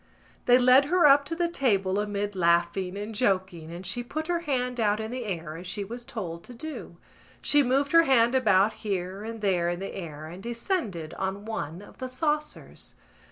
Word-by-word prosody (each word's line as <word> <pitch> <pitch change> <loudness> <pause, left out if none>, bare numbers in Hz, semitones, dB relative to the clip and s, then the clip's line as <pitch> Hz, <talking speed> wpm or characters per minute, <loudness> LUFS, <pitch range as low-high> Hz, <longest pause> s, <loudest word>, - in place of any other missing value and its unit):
They 245 0 +7
led 255 +2 +6
her 350 +2 +3
up 280 0 +7
to 330 - -3
the 345 0 +1
table 200 - +1
amid 205 -1 -2
laughing 175 +2 +1
and 210 +2 -5
joking 190 -7 0
and 175 +2 -8
she 205 +7 -1
put 310 +6 -4
her 345 0 0
hand 250 -6 -2
out 210 -1 +2
in 220 +1 -4
the 250 -1 -4
air 165 -5 -4
as 175 +2 -8
she 205 +2 -3
was 235 +5 -7
told 175 -8 -6
to 250 - -11
do. 315 +5 -8 0.4
She 290 - +4
moved 275 +2 +1
her 330 0 +6
hand 240 -3 +4
about 210 -5 +4
here 195 -1 -3
and 225 0 -6
there 180 -4 +1
in 175 0 -3
the 195 - -5
air 155 -5 -7
and 175 +4 -9
descended 230 - -3
on 195 +2 -3
one 185 -5 -5
of - - -16
the 255 -1 -4
saucers. 300 +3 -3
215 Hz, 200 wpm, -27 LUFS, 185-255 Hz, 0.4 s, They